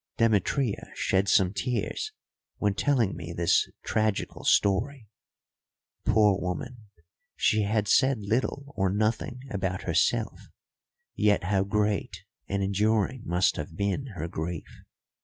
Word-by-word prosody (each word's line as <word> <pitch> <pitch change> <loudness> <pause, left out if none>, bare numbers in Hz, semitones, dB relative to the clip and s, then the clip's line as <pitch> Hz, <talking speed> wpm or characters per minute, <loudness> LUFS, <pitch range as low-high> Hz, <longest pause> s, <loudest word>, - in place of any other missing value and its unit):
Demetria 115 +2 +1
shed 95 +1 +1
some 95 -2 +4
tears 110 0 -2 0.5
when 100 -1 +1
telling 115 - +1
me 85 0 -7
this 85 0 +2
tragical 110 -2 -1
story. 110 +5 +2 1.0
Poor 105 -3 +4
woman, 120 +5 -5 0.5
she 110 - +2
had 105 0 0
said 135 +5 +4
little 130 +7 -2
or 95 -1 +1
nothing 110 +5 -1
about 95 -2 -2
herself, 100 +7 0 0.7
yet 105 -2 +2
how 95 +1 +1
great 105 0 -1 0.2
and 100 0 -1
enduring 105 +4 +1
must 90 +2 +2
have 80 +1 -6
been 100 +7 -1
her 85 0 -4
grief. 85 -1 -6
100 Hz, 120 wpm, -27 LUFS, 95-115 Hz, 1.0 s, some